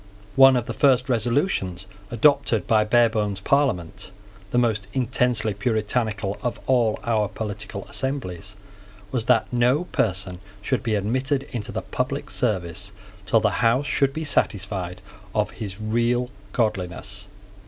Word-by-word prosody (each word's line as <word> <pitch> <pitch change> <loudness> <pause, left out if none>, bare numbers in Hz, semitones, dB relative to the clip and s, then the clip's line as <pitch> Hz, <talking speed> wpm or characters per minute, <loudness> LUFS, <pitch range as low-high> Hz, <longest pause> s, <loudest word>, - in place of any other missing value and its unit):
One 135 -1 +8
of 120 -2 0
the - - -4
first 130 -2 +3
resolutions 115 - 0 0.2
adopted 120 - +3
by 110 -1 +4
Barebone's 110 -3 +2
Parliament, 100 - 0 0.4
the 120 - -1
most 110 -5 +1
intensely 125 -3 +1
Puritanical 110 -2 -1
of 120 - -2
all 120 -4 +2
our 110 -3 +1
political 105 -1 -6
assemblies, 105 -8 -4 0.6
was 120 -3 -1
that 115 - +4
no 125 +6 +3
person 95 - -1 0.2
should 130 +3 0
be 110 -2 0
admitted 130 +7 0
into 120 -2 -4
the - - -4
public 135 +3 -3
service 95 -4 -1 0.4
till 110 +3 +4
the - - +1
House 120 +5 +3
should 140 -2 +1
be 160 +3 -4
satisfied 95 - -1 0.3
of 105 -1 +1
his 100 -3 -7
real 120 +3 0 0.2
godliness. 100 -2 -2
115 Hz, 130 wpm, -24 LUFS, 100-125 Hz, 0.6 s, One